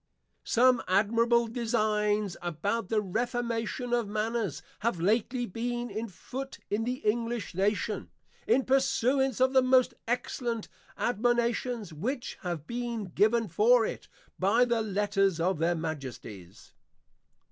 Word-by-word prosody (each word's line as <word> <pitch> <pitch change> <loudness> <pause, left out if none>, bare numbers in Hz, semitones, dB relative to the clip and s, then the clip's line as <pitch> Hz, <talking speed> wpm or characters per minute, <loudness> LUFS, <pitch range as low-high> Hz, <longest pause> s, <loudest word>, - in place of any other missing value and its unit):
Some 250 +1 +4
admirable 230 +5 +3
Designs 215 -4 0
about 180 +6 -2
the 220 -1 +2
Reformation 240 +3 -2
of 240 -3 +1
Manners, 215 - -2 0.2
have 220 -5 -1
lately 230 +7 +1
been 240 +3 -3
on 225 +2 -2
foot 265 +7 -7
in 215 +2 0
the 250 +1 -1
English 230 0 -1
Nation, 200 +3 -1 0.4
in 265 - +3
pursuance 265 -1 +2
of 260 +1 +3
the 260 - +6
most 255 -1 +4
excellent 235 -1 -2 0.3
Admonitions 240 -3 0
which 240 - -4
have 170 -5 -4
been 235 -2 -4
given 225 +2 +3
for 225 +7 +4
it, - - -5 0.3
by 220 +6 +4
the 235 -2 +1
Letters 200 -3 +1
of 175 0 +1
Their 170 +2 +2
Majesties. 130 - -7
225 Hz, 125 wpm, -29 LUFS, 200-240 Hz, 0.4 s, the